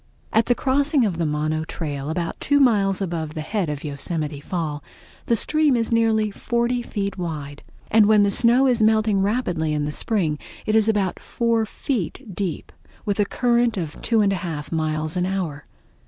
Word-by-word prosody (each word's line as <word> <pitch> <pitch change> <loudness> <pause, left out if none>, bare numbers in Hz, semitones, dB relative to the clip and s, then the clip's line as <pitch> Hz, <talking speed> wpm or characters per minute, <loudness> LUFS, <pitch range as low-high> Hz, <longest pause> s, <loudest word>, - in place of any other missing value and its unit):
At 225 +1 +3
the 245 - +3
crossing 275 0 +2
of 180 -5 -2
the 165 - +1
Mono 155 +1 -1
Trail, 145 -3 -5
about 170 +1 -3
two 285 0 +2
miles 200 -7 +3
above 165 -3 -4
the 155 - -3
head 185 +1 -2
of 145 -1 -4
the 150 - -5
Yosemite 150 +1 -3
Fall, 155 -2 -4 0.4
the 235 - +3
stream 300 +4 +2
is 230 -1 -1
nearly 220 -2 +2
forty 235 +3 -1
feet 200 -4 -4
wide, 150 -4 -5 0.3
and 215 -1 +6
when 210 -1 +5
the 200 - +2
snow 240 +5 +4
is 245 -3 +2
melting 215 -2 +3
rapidly 185 -7 0
in 150 -1 -1
the 150 - -2
spring 160 -4 0 0.3
it 215 - +1
is 220 0 +4
about 200 -4 0
four 230 -2 0
feet 230 - -4
deep, 185 -5 -4 0.3
with 205 0 -1
a 205 - +4
current 240 0 +1
of 165 -4 -5
two 225 -2 +2
and 200 -1 +2
a - - -1
half 165 -5 -5
miles 155 0 -1
an 180 0 0
hour. 175 -6 -3
195 Hz, 190 wpm, -23 LUFS, 155-230 Hz, 0.4 s, and